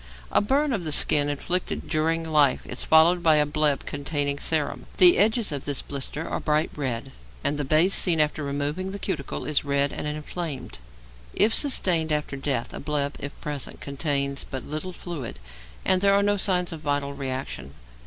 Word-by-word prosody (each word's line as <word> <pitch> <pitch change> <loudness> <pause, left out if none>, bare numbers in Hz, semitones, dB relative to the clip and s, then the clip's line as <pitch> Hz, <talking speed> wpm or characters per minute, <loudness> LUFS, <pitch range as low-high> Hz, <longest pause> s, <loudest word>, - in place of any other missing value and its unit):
A - - +4
burn 275 +6 +1
of 200 -6 -2
the 155 - -3
skin 145 0 +3
inflicted 175 +5 -2
during 165 +1 0
life 150 -4 +3
is 125 - -4
followed 165 +3 +5
by 160 -2 +5
a 150 -1 +4
bleb 150 -1 0
containing 145 0 -2
serum; 155 -1 -1
the 180 -2 +7
edges 220 0 +3
of 140 -2 -4
this 145 -2 -1
blister 145 +3 -5
are - - -3
bright 150 0 0
red, 135 -2 -3 0.3
and 145 - 0
the 145 - -2
base, 155 +7 +3
seen 170 -4 +4
after 150 0 +1
removing 145 +6 -3
the 200 - -5
cuticle, 180 -8 -4
is 155 -2 +1
red 140 0 0
and - - -4
inflamed; 150 - -5 0.6
if 220 +2 +4
sustained 175 - +3
after 150 -2 -1
death, 135 -3 -2
a - - -6
bleb, 145 -1 -1
if 140 - -8
present, 145 -3 -5
contains 140 -1 -2
but 130 - -7
little 155 +5 -5
fluid, 165 - -7 0.5
and 185 -1 +3
there 200 0 +4
are 200 - +3
no 205 0 +2
signs 180 -3 +2
of 165 - -6
vital 145 -2 -1
reaction. 130 -1 -5
150 Hz, 185 wpm, -25 LUFS, 140-175 Hz, 0.6 s, the